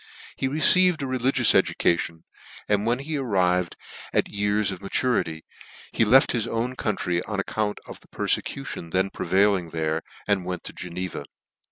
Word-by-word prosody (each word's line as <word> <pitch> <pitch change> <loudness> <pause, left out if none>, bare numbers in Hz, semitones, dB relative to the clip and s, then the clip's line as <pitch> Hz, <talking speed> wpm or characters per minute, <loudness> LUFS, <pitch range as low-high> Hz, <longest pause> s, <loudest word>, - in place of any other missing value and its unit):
He 135 - -1
received 160 +3 +4
a - - -1
reli 130 0 0
gious 125 -5 +5
education; 85 -1 +1 0.4
and 105 +1 +1
when 120 +1 +2
he 150 +3 -4
arrived 90 -8 +1 0.4
at - - +1
years 100 0 0
of 95 -1 -7
maturity, 100 -6 -1 0.5
he - - +3
left 130 +5 +5
his 115 -2 -1
own 120 +3 -2
country 90 -7 -1
on 105 -1 -3
account 105 +1 -2
of - - -10
the - - -23
perfecution 85 - -2
then 95 +3 0
prevailing 95 -2 +1
there, 80 0 -1 0.3
and 100 -3 +1
went 90 -1 -5
to - - -7
Geneva. 90 -3 -5
100 Hz, 160 wpm, -25 LUFS, 90-125 Hz, 0.5 s, gious